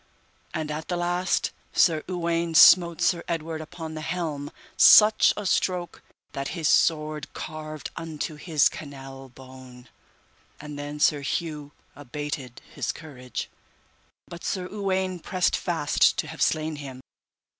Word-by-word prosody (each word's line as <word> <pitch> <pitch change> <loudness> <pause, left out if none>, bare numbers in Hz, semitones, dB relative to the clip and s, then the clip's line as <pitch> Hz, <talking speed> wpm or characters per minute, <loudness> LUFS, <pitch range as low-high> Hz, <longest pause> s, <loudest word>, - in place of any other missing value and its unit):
And 155 -3 -3
at 155 +1 -5
the 175 - -2
last 175 +1 0 0.2
Sir 160 -3 +4
Uwaine 170 -2 -1
smote 170 0 +7
Sir 170 0 +2
Edward 160 -1 -3
upon 160 0 -8
the 155 - -6
helm 155 -4 -3 0.3
such 215 0 +7
a 210 - -4
stroke 180 -2 -1 0.3
that 140 0 -4
his 160 -2 0
sword 155 -3 +1
carved 155 -1 -7
unto 160 -1 -5
his 150 -1 +2
canel 135 -2 -9
bone, 130 -1 -14 0.7
and 150 -1 -8
then 145 +1 -6
Sir 150 -1 +3
Hue 150 0 -4 0.2
abated 145 -2 -6
his - - -2
courage, 125 - -7 0.8
but 170 -1 -10
Sir 185 -2 -2
Uwaine 190 -3 -1
pressed 180 +2 0
fast 165 -5 +2
to - - -1
have 160 +1 -9
slain 155 -1 +1
him. 135 -3 -8
155 Hz, 135 wpm, -25 LUFS, 145-170 Hz, 0.8 s, smote